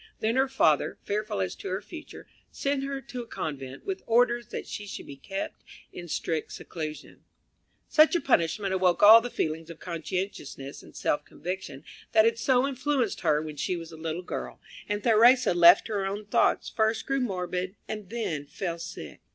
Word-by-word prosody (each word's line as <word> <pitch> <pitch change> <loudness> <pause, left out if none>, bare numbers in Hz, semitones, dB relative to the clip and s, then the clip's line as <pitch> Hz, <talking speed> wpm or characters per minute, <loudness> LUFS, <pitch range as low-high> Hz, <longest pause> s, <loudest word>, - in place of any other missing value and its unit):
Then 225 +2 0
her 265 +1 +3
father, 160 - +2
fearful 210 - -2
as 95 - -1
to - - -7
her 190 +1 -1
future, 310 - -10 0.2
sent 275 -1 -1
her 275 0 -3
to 250 -2 -7
a 235 - -10
convent, 135 -8 -6
with 385 -1 -3
orders 240 0 +3
that - - -6
she 205 - -7
should - - -7
be 140 - -9
kept 195 +8 -6 0.3
in 175 -1 -8
strict 160 0 -2
seclusion. 155 -3 -7 0.6
Such 310 +3 +5
a - - +3
punishment 195 - +1
awoke 185 -1 +2
all 220 +2 +10
the 245 - -4
feelings 160 -5 -3
of 170 - -9
conscientiousness 170 -5 -5
and - - -16
self 150 - 0
conviction 180 -6 -6 0.3
that 220 - +6
had 230 0 +2
so 260 +1 +3
influenced 265 -3 -1
her 155 -3 +2
when 155 -1 -7
she 180 - -1
was 165 -1 -8
a - - -9
little 160 +2 -4
girl, - - -6 0.3
and 205 0 -2
Theresa, 240 +1 +5
left 175 +2 +7
to 220 - -5
her 200 -2 0
own 205 +2 -4
thoughts, 205 - +2
first 220 0 0
grew 275 0 0
morbid, 185 -4 -2
and 210 -3 -6
then 170 -11 -3
fell 170 +1 -4
sick. 125 - -8
195 Hz, 185 wpm, -27 LUFS, 165-235 Hz, 0.6 s, all